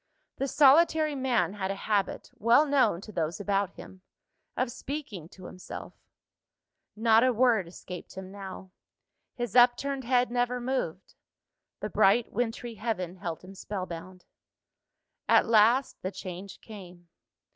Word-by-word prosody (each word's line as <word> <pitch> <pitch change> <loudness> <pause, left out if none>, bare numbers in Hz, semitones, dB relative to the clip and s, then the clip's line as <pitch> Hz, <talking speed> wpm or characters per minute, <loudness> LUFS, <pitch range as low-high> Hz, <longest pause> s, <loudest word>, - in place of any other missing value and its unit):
The 275 - -1
solitary 305 +2 +5
man 260 -7 0
had 195 -2 -3
a 195 - -2
habit, 200 -1 -2
well 235 +7 +5
known 275 - +2
to 215 - -10
those 165 -2 -2
about 200 -1 0
him, 185 - -12 0.6
of 255 -1 0
speaking 235 - -6
to 185 -1 -13
himself; 185 - -9 1.0
not 225 +1 +4
a 255 - +4
word 230 -6 +2
escaped 180 +1 -10
him 190 0 -8
now; 190 -1 -9 0.6
his 240 -4 -4
upturned 255 +3 +4
head 245 -1 +2
never 245 0 0
moved; 240 -9 -3 0.7
the - - -3
bright 225 +5 +3
wintry 235 +1 -2
heaven 195 -5 -3
held 175 -3 -5
him 185 +1 -11
spellbound. 185 -2 -7 1.0
At - - +6
last, 230 +4 +3
the 185 - -3
change 185 0 -8
came. 180 -5 -12
215 Hz, 135 wpm, -28 LUFS, 185-245 Hz, 1.0 s, At